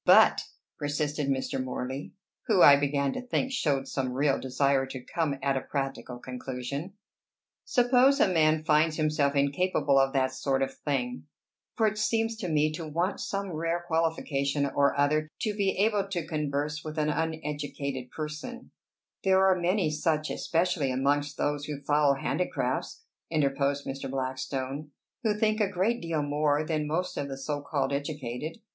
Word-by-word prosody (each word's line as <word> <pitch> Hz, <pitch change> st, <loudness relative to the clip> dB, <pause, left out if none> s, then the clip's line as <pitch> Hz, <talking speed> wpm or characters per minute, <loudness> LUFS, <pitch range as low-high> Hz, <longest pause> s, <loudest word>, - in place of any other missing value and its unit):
"But," -, -, +6 dB, 0.4 s
persisted 145 Hz, 0 st, -1 dB
Mr. 135 Hz, -1 st, -1 dB
Morley, 130 Hz, +2 st, -5 dB, 0.3 s
who, 180 Hz, -, +5 dB
I 140 Hz, -, +10 dB
began 140 Hz, -1 st, 0 dB
to -, -, -4 dB
think, 250 Hz, +1 st, -1 dB
showed 140 Hz, -, 0 dB
some 130 Hz, -2 st, -2 dB
real 140 Hz, +1 st, +2 dB
desire 135 Hz, +1 st, +1 dB
to 130 Hz, 0 st, -6 dB
come 160 Hz, -4 st, -1 dB
at 140 Hz, -1 st, +2 dB
a 135 Hz, -, 0 dB
practical 135 Hz, -3 st, -4 dB
conclusion, 130 Hz, +6 st, -5 dB, 0.7 s
"suppose 255 Hz, +2 st, +4 dB
a -, -, +5 dB
man 155 Hz, -3 st, +3 dB
finds 155 Hz, +1 st, +3 dB
himself 150 Hz, -2 st, +1 dB
incapable 140 Hz, 0 st, +2 dB
of 135 Hz, 0 st, +3 dB
that 130 Hz, -1 st, +1 dB
sort 135 Hz, 0 st, 0 dB
of 135 Hz, 0 st, -3 dB
thing 125 Hz, -2 st, -3 dB, 0.5 s
for 225 Hz, -, +2 dB
it 215 Hz, 0 st, 0 dB
seems 225 Hz, +1 st, +1 dB
to 185 Hz, -5 st, -4 dB
me 155 Hz, 0 st, +2 dB
to 155 Hz, +1 st, -5 dB
want 170 Hz, +6 st, -1 dB
some 195 Hz, -1 st, -3 dB
rare 165 Hz, +2 st, -1 dB
qualification 155 Hz, -4 st, 0 dB
or 140 Hz, 0 st, +1 dB
other 155 Hz, +2 st, +2 dB
to 215 Hz, -, 0 dB
be 200 Hz, -2 st, 0 dB
able 205 Hz, -1 st, +2 dB
to 175 Hz, -5 st, -3 dB
converse 150 Hz, -1 st, -2 dB
with 155 Hz, 0 st, -6 dB
an 150 Hz, 0 st, +1 dB
uneducated 145 Hz, -4 st, -3 dB
person" 155 Hz, -, -6 dB, 0.5 s
"There 190 Hz, 0 st, +4 dB
are 190 Hz, -1 st, +5 dB
many 180 Hz, -1 st, +1 dB
such, 155 Hz, 0 st, 0 dB
especially 165 Hz, -4 st, 0 dB
amongst 145 Hz, +3 st, 0 dB
those 145 Hz, 0 st, -1 dB
who 150 Hz, -2 st, -5 dB
follow 145 Hz, -1 st, +3 dB
handicrafts," 180 Hz, -, -2 dB, 0.3 s
interposed 140 Hz, -2 st, 0 dB
Mr. 135 Hz, 0 st, -5 dB
Blackstone, 135 Hz, +2 st, -3 dB, 0.3 s
"who 215 Hz, -4 st, +1 dB
think 215 Hz, 0 st, +2 dB
a 205 Hz, -, +2 dB
great 205 Hz, +6 st, 0 dB
deal 165 Hz, -3 st, -1 dB
more 145 Hz, +1 st, +1 dB
than 155 Hz, -2 st, -1 dB
most 180 Hz, +4 st, -2 dB
of 140 Hz, -, -2 dB
the 135 Hz, -1 st, -6 dB
so 145 Hz, +1 st, -3 dB
called 140 Hz, -1 st, -1 dB
educated. 145 Hz, 0 st, -4 dB
150 Hz, 160 wpm, -28 LUFS, 140-170 Hz, 0.7 s, I